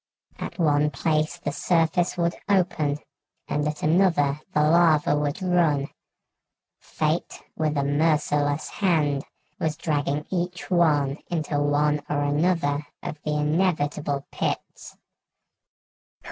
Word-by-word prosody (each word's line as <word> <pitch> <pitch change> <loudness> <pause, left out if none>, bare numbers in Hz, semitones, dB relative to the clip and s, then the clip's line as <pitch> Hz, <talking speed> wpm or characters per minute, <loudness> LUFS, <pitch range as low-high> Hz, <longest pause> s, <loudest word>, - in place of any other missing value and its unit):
At - - -6
one 150 -3 +3
place 155 +2 0
the 160 -4 -4
surface 170 +3 +1
would 170 0 +1 0.2
open 175 -7 +1 0.5
and 150 0 -1
at 150 0 -4
another 155 -4 +3
the 150 - +2
lava 155 -2 +4
would 145 +4 -2
run. 165 -6 +2 0.9
Fate, - - -2
with 155 -1 -1
a 140 - +1
merciless 145 0 +1
hand, 150 -8 +1 0.3
was 155 -2 -1
dragging 150 -2 -1
each 180 0 -3
one 150 -5 +2
into 155 -4 -1
one 145 +1 +2
or 145 -1 0
another 145 -1 +1 0.2
of 150 - -6
the 150 0 -2
inevitable 150 -3 0
pits." - - -4
150 Hz, 115 wpm, -25 LUFS, 145-170 Hz, 0.9 s, lava